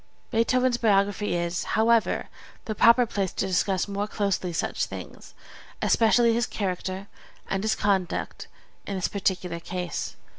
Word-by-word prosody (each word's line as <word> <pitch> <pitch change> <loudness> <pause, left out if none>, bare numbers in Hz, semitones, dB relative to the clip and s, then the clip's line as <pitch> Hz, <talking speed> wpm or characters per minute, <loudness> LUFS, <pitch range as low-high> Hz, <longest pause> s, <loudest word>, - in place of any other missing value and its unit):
Beethoven's 250 +2 +2
biography 205 -3 +2
is, 170 0 -1
however, 225 +1 +2 0.4
the 220 - -2
proper 235 +3 +6
place 195 -4 -2
to - - -1
discuss 190 +1 +1
more 200 +1 -2
closely 200 -4 -1
such 165 - -1
things, - - -10 0.4
especially 230 +1 +4
his 235 +1 +1
character 190 -1 -3 0.4
and 195 +1 -2
his 220 - +1
conduct 190 -3 -1 0.4
in 200 - -3
this 185 - 0
particular 185 -3 -2
case. 180 0 -4
200 Hz, 135 wpm, -26 LUFS, 185-225 Hz, 0.4 s, proper